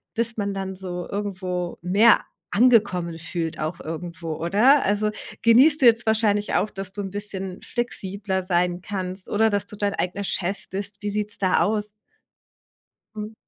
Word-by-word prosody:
bis 230 Hz, 0 st, -1 dB
man 200 Hz, -1 st, -1 dB
dann 190 Hz, -1 st, -4 dB
so 180 Hz, -2 st, -5 dB
irgendwo 185 Hz, -3 st, -3 dB
mehr 205 Hz, +6 st, +5 dB, 0.3 s
angekommen 200 Hz, -8 st, +3 dB
fühlt 165 Hz, 0 st, -4 dB
auch 160 Hz, +3 st, -3 dB
irgendwo, 165 Hz, 0 st, -5 dB
oder? 215 Hz, -, +4 dB
Also, 210 Hz, +1 st, +1 dB, 0.3 s
genießt 265 Hz, +7 st, +6 dB
du -, -, +5 dB
jetzt 235 Hz, 0 st, +5 dB
wahrscheinlich 215 Hz, -2 st, +1 dB
auch, 210 Hz, -, +2 dB
dass 195 Hz, -2 st, -7 dB
du 205 Hz, -, -9 dB
'n 195 Hz, -, -4 dB
bisschen 195 Hz, -2 st, -5 dB
flexibler 200 Hz, -5 st, -3 dB
sein 180 Hz, -1 st, 0 dB
kannst 185 Hz, 0 st, -5 dB
oder 220 Hz, +2 st, +3 dB
dass 205 Hz, -1 st, -1 dB
du 210 Hz, -, -7 dB
dein 205 Hz, -1 st, 0 dB
eigener 195 Hz, +3 st, -2 dB
Chef 195 Hz, +1 st, -2 dB
bist? 200 Hz, +1 st, -5 dB
Wie 205 Hz, -, -2 dB
sieht's 210 Hz, 0 st, -2 dB
da 185 Hz, -2 st, +2 dB
aus? 210 Hz, 0 st, 0 dB, 1.3 s
Mhm. 215 Hz, +1 st, -6 dB
200 Hz, 160 wpm, -24 LUFS, 180-210 Hz, 1.3 s, genießt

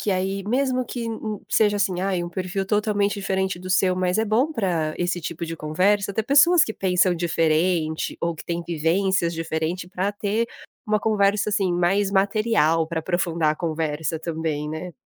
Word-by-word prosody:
que 210 Hz, -, -1 dB
aí 195 Hz, +1 st, -1 dB
mesmo 255 Hz, +4 st, 0 dB
que 235 Hz, -1 st, -5 dB, 0.4 s
seja 210 Hz, -2 st, +3 dB
assim, 190 Hz, -3 st, 0 dB
ai, 185 Hz, -2 st, -1 dB
um -, -, -5 dB
perfil 185 Hz, +2 st, -3 dB
totalmente 205 Hz, 0 st, +1 dB
diferente 190 Hz, -2 st, -1 dB
do 185 Hz, +1 st, -8 dB
seu, 185 Hz, 0 st, +3 dB
mas 185 Hz, +1 st, 0 dB
é 220 Hz, -, +2 dB
bom 235 Hz, +8 st, +1 dB
para 175 Hz, -, -1 dB
esse 175 Hz, 0 st, -1 dB
tipo 170 Hz, +1 st, -5 dB
de 165 Hz, 0 st, -5 dB
conversa 190 Hz, +7 st, +1 dB
ter 220 Hz, +2 st, -1 dB
pessoas 315 Hz, +6 st, +6 dB
que 220 Hz, -, -4 dB
pensam 185 Hz, -2 st, +2 dB
diferente 165 Hz, -1 st, 0 dB
ou 170 Hz, 0 st, -1 dB
que 155 Hz, -, -10 dB
têm 170 Hz, 0 st, -3 dB
vivências 170 Hz, +2 st, +1 dB
diferente 165 Hz, +2 st, -3 dB
para 190 Hz, +2 st, -1 dB
ter 210 Hz, +3 st, -1 dB, 0.4 s
uma 215 Hz, 0 st, +1 dB
conversa, 210 Hz, -1 st, +1 dB
assim, 195 Hz, -3 st, +1 dB
mais 195 Hz, +3 st, +1 dB
material 195 Hz, -5 st, +2 dB
para 165 Hz, -1 st, -2 dB
aprofundar 165 Hz, -2 st, 0 dB
a -, -, -5 dB
conversa 160 Hz, -1 st, -2 dB
também, 160 Hz, -2 st, -3 dB
né. 160 Hz, +3 st, -6 dB
185 Hz, 175 wpm, -23 LUFS, 165-205 Hz, 0.4 s, pessoas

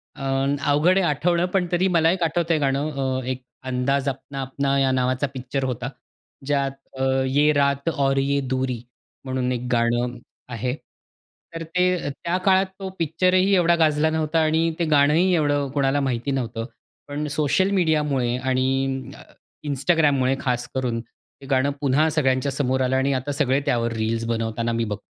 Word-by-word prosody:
अ, 135 Hz, -, -8 dB, 0.5 s
अवघड 165 Hz, +6 st, +3 dB
आहे 190 Hz, -, +2 dB
आठवणं, 170 Hz, +4 st, +1 dB
पण 190 Hz, -2 st, +2 dB
तरी 180 Hz, +2 st, +2 dB
मला 165 Hz, 0 st, +4 dB
एक 180 Hz, -1 st, -1 dB
आठवतंय 165 Hz, 0 st, +1 dB
हे -, -, -3 dB
गाणं. 140 Hz, +2 st, 0 dB
अ, 130 Hz, -2 st, -2 dB
एक 130 Hz, 0 st, -3 dB, 0.3 s
अंदाज 130 Hz, +2 st, 0 dB
अपना 135 Hz, +1 st, -6 dB
अपना 135 Hz, +1 st, -1 dB
या 135 Hz, -1 st, +2 dB
नावाचा 130 Hz, +2 st, 0 dB
पिक्चर 130 Hz, +1 st, -3 dB
होता, 125 Hz, -1 st, -3 dB, 0.6 s
ज्यात 140 Hz, -1 st, 0 dB, 0.3 s
अ, 130 Hz, -, -1 dB, 0.2 s
ये 145 Hz, +3 st, +3 dB
रात 140 Hz, +1 st, +1 dB
और 135 Hz, -3 st, 0 dB
ये 140 Hz, +1 st, +1 dB
दूरी. 130 Hz, -1 st, -2 dB, 0.5 s
म्हणून 130 Hz, -1 st, -1 dB
एक 125 Hz, 0 st, -3 dB
गाणं 120 Hz, +1 st, +1 dB, 0.4 s
आहे. 125 Hz, +2 st, -2 dB, 0.8 s
तर 165 Hz, -, -4 dB
ते 180 Hz, -1 st, 0 dB
त्या 170 Hz, +5 st, -2 dB
काळात 190 Hz, 0 st, +4 dB
तो 190 Hz, -1 st, -5 dB
पिक्चरही 185 Hz, +4 st, +2 dB
एवढा 170 Hz, -2 st, +4 dB
गाजला 155 Hz, -1 st, +2 dB
नव्हता 160 Hz, 0 st, 0 dB
आणि 160 Hz, +1 st, +2 dB
ते 170 Hz, -, +1 dB
गाणंही 155 Hz, +5 st, +3 dB
एवढं 145 Hz, -2 st, +1 dB
कोणाला 140 Hz, 0 st, +1 dB
माहीत 125 Hz, -2 st, -2 dB
नव्हतं. 115 Hz, -3 st, -3 dB, 0.4 s
पण 145 Hz, +1 st, -3 dB
सोशल 155 Hz, +6 st, +2 dB
मीडियामुळे 150 Hz, -9 st, +1 dB
आणि 130 Hz, +1 st, -1 dB
अ, -, -, -13 dB, 0.5 s
Instagramमुळे 140 Hz, -2 st, +2 dB
खासकरून 125 Hz, -1 st, -2 dB
ते 120 Hz, +3 st, -21 dB
गाणं 135 Hz, +1 st, +2 dB
पुन्हा 145 Hz, +3 st, +3 dB
सगळ्यांच्या 140 Hz, -3 st, +1 dB
समोर 130 Hz, -1 st, 0 dB
आलं 130 Hz, 0 st, +1 dB
आणि 135 Hz, +1 st, +1 dB
आता 130 Hz, +2 st, -2 dB
सगळे 135 Hz, -1 st, +1 dB
त्यावर 115 Hz, -1 st, 0 dB
रील्स 115 Hz, +1 st, -1 dB
बनवताना 115 Hz, 0 st, -2 dB
मी 115 Hz, 0 st, 0 dB
बघ 105 Hz, -, -2 dB
140 Hz, 165 wpm, -23 LUFS, 130-155 Hz, 0.8 s, मला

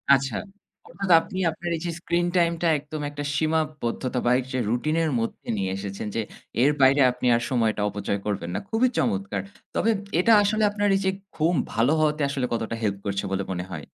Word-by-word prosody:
আচ্ছা। 135 Hz, +1 st, -2 dB, 0.5 s
অর্থাৎ, 195 Hz, -2 st, -5 dB
আপনি 185 Hz, -, -6 dB
আপনার 170 Hz, +2 st, -5 dB
এইযে 170 Hz, +1 st, -3 dB
স্ক্রিন 175 Hz, 0 st, 0 dB
টাইমটা 170 Hz, 0 st, +2 dB
একদম 150 Hz, +1 st, -7 dB
একটা 145 Hz, 0 st, -6 dB
সীমাবদ্ধতাবাহিক 130 Hz, -5 st, 0 dB
যে 130 Hz, -, 0 dB
রুটিনের 155 Hz, +7 st, +1 dB
মধ্যে 115 Hz, -, -4 dB
নিয়ে 95 Hz, -1 st, -1 dB
এসেছেন 100 Hz, +1 st, -5 dB
যে, 115 Hz, -, +1 dB, 0.4 s
এর 145 Hz, -, +5 dB
বাইরে 135 Hz, +2 st, +6 dB
আপনি 125 Hz, 0 st, -6 dB
আর 120 Hz, -, 0 dB
সময়টা 115 Hz, -4 st, +1 dB
অপচয় 100 Hz, 0 st, -2 dB
করবেন 95 Hz, -5 st, -2 dB
না। -, -, 0 dB
খুবই 240 Hz, +3 st, +3 dB
চমৎকার। 100 Hz, 0 st, 0 dB, 0.3 s
তবে 230 Hz, -, +2 dB, 0.3 s
এটা 225 Hz, +5 st, +5 dB
আসলে 215 Hz, +1 st, +1 dB
আপনার 205 Hz, 0 st, 0 dB
এইযে 190 Hz, -1 st, +1 dB, 0.2 s
ঘুম 165 Hz, +2 st, +2 dB, 0.2 s
ভালো 120 Hz, +6 st, +3 dB
হওয়াতে 150 Hz, -1 st, +1 dB
আসলে 135 Hz, -3 st, -1 dB
কতটা 115 Hz, 0 st, -2 dB
হেল্প 100 Hz, -2 st, 0 dB
করছে 100 Hz, 0 st, -1 dB
বলে 95 Hz, 0 st, 0 dB
মনে 90 Hz, 0 st, -3 dB
হয়? 75 Hz, -4 st, -6 dB
135 Hz, 175 wpm, -25 LUFS, 105-165 Hz, 0.5 s, বাইরে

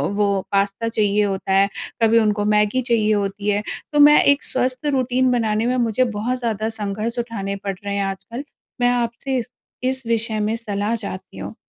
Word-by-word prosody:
वो 205 Hz, 0 st, +2 dB, 0.2 s
पास्ता 200 Hz, +3 st, 0 dB
चाहिए 210 Hz, -2 st, +2 dB
होता 195 Hz, -1 st, -2 dB
है, 195 Hz, +1 st, +4 dB, 0.3 s
कभी 225 Hz, 0 st, +5 dB
उनको 210 Hz, -2 st, +1 dB
मैगी 210 Hz, +4 st, +2 dB
चाहिए 225 Hz, -3 st, +2 dB
होती 200 Hz, 0 st, -1 dB
है। 205 Hz, 0 st, +1 dB, 0.3 s
तो 295 Hz, -, +3 dB
मैं 295 Hz, +1 st, +8 dB
एक 285 Hz, 0 st, +4 dB
स्वस्थ 255 Hz, +2 st, -1 dB
रूटीन 255 Hz, 0 st, +2 dB
बनाने 225 Hz, -2 st, +1 dB
में 250 Hz, -, +1 dB
मुझे 225 Hz, +3 st, +2 dB
बहुत 245 Hz, +5 st, -1 dB
ज़्यादा 220 Hz, -2 st, -1 dB
संघर्ष 215 Hz, +4 st, -3 dB
उठाने 210 Hz, -5 st, -3 dB
पड़ 200 Hz, 0 st, -4 dB
रहे 200 Hz, 0 st, -3 dB
हैं 200 Hz, -, 0 dB
आजकल। 230 Hz, +7 st, -5 dB, 0.4 s
मैं 245 Hz, -, +4 dB
आपसे 245 Hz, +2 st, -1 dB
इस 245 Hz, 0 st, -5 dB, 0.3 s
इस 260 Hz, 0 st, -1 dB
विषय 230 Hz, -1 st, 0 dB
में 215 Hz, +1 st, 0 dB
सलाह 210 Hz, -1 st, -2 dB
चाहती 200 Hz, -, -7 dB
हूँ। 100 Hz, +2 st, -6 dB
220 Hz, 185 wpm, -21 LUFS, 205-245 Hz, 0.4 s, मैं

